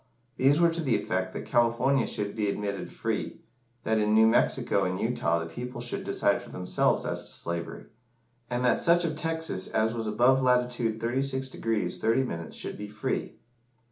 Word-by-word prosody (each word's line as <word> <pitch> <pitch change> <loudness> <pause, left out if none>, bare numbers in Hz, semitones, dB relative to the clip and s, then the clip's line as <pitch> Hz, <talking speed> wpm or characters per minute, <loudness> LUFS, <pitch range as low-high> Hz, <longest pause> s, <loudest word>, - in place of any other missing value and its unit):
These 140 +4 +4
were 170 -1 +5
to 165 +1 -2
the 130 -7 +1
effect 95 -2 -1
that - - -5
California 120 +2 +2
should 100 -1 -3
be 105 -2 0
admitted 100 -1 -3
free - - -3 0.4
that 110 0 +1
in 105 0 +2
New 110 0 +7
Mexico 115 +2 +2
and - - -1
Utah 85 - +1
the 85 - -3
people 120 +9 -7
should 120 0 -4
decide - - +1
for - - -12
themselves 90 0 0
as - - -2
to - - -9
slavery 85 0 -5 0.6
and 125 0 -1
that 125 - +3
such 170 +1 +4
of 160 -2 -2
Texas 160 - -2
as 110 +1 +1
was 115 -2 -3
above 125 +5 +4
latitude 125 -3 +1
36° 130 +2 -2 0.4
30´ 110 -8 0
should - - -6
be 105 - -5
free. 105 +1 -3
120 Hz, 170 wpm, -28 LUFS, 105-130 Hz, 0.6 s, New